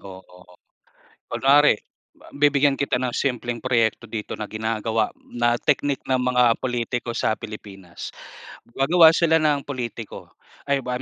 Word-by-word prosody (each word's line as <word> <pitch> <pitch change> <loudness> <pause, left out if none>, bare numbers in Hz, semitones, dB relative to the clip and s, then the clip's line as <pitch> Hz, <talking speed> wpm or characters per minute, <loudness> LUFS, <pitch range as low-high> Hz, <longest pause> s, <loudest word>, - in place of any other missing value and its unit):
oo. 90 -2 -14 0.7
Kunwari 140 -3 +4 0.4
ba - - -19
bibigyan 145 -1 +3
kita 135 -2 -1
ng 125 -1 -2
simpleng 120 -3 -2
proyekto 120 -2 0
dito 110 -2 -5
na 105 - -6
ginagawa, 110 0 -1 0.2
na 120 0 0
teknik 145 -1 0
ng 130 - +3
mga 125 -2 +3
pulitiko 120 -1 -3
sa 110 - 0
Pilipinas. 95 -5 -9 0.7
Gagawa 160 +4 +6
sila 160 -1 +3
ng 145 -2 +1
pulitiko, 120 -5 -6 0.4
ay 140 -2 0
ba 125 0 -3
125 Hz, 130 wpm, -23 LUFS, 110-140 Hz, 0.7 s, Gagawa